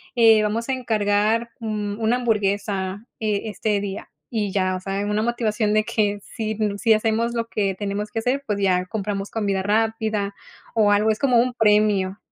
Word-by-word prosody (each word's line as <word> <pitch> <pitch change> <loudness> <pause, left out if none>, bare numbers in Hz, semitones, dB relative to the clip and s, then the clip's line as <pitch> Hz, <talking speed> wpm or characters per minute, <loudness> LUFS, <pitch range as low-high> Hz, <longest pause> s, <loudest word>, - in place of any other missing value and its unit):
eh, 225 -2 +6
vamos 225 +4 -2
a 265 - +2
encargar, 220 -1 +1
mm, 210 -2 -3
una 225 +2 +2
hamburguesa, 205 -3 -1
eh, 210 -2 0
este 210 -1 -1
día". 200 -1 -6 0.2
Y 210 -4 -1
ya, 185 -1 0
o 185 - -4
sea, 195 +1 -3
en 205 - -2
una 210 +1 +1
motivación 220 -3 0
de 215 - +3
que 205 -2 0
si, 220 -2 -4 0.2
si 225 +1 +4
hacemos 225 +2 +1
lo 230 -1 -2
que 200 -4 -1
tenemos 205 +1 -3
que 225 - -2
hacer, 255 +5 -1
pues 205 -2 -1
ya 185 -2 +2
compramos 200 -1 -4
comida 200 -4 -1
rápida 215 -1 0 0.4
o 210 -2 +4
algo, 205 +2 +3
es 215 - -3
como 255 -4 +3
un 250 +1 +1
premio. 210 -3 +2
210 Hz, 185 wpm, -23 LUFS, 200-225 Hz, 0.4 s, eh